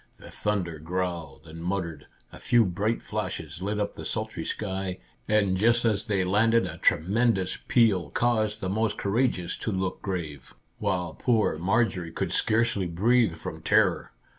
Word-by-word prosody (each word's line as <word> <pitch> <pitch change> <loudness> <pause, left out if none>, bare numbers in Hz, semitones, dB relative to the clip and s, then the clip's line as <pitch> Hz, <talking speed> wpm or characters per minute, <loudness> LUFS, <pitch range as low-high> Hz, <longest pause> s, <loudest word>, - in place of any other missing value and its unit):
The - - -13
thunder 90 -7 -2
growled 85 -3 -4
and 80 +1 -9
muttered, 90 -3 -3 0.2
a - - -11
few 120 -2 +4
bright 100 +5 -1
flashes 95 -5 -4
lit 105 +2 -2
up 105 - -1
the - - -8
sultry - - -3
sky, 95 -3 -3 0.3
and 100 -3 +2
just 115 +4 +3
as 110 0 +1
they 100 -3 +1
landed 115 +5 +3
a - - -7
tremendous 95 +2 +2
peal 110 -7 +3
caused 110 -3 0
the 95 - -2
most 110 +2 0
courageous 100 -4 0
to 110 - -3
look 95 -1 -2
grave, 80 -8 -5 0.2
while 90 -3 -1
poor 110 -10 +1
Marjorie 95 -2 +1
could - - -3
scarcely 110 -4 +1
breathe 110 +2 +2
from - - -7
terror. - - +2
95 Hz, 155 wpm, -27 LUFS, 90-110 Hz, 0.3 s, few